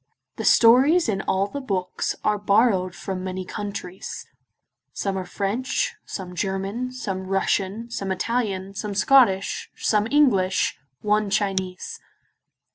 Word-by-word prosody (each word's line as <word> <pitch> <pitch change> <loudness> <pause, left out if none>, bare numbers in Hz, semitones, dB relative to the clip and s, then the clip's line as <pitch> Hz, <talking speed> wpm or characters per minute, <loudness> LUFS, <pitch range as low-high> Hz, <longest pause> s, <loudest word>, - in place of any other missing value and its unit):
The - - -4
stories 265 +9 +6
in 195 -3 0
all 190 +1 +1
the 280 +8 -6
books 190 -7 -2
are 210 -1 +1
borrowed 200 -3 +2
from 185 +1 -5
many 185 0 -4
countries; 200 -2 -6 0.7
some 195 -1 -2
are 190 -1 -3
French, 250 - -1
some 185 -2 -6
German, 195 +7 -2
some 195 -7 -4
Russian, 195 +3 0
some 195 -4 -3
Italian, 195 -1 -2
some 200 0 -4
Scottish, 205 -3 +3
some 210 0 +1
English, 215 -11 +2 0.2
one 210 0 +1
Chinese. 190 -2 -2
200 Hz, 120 wpm, -24 LUFS, 190-230 Hz, 0.7 s, stories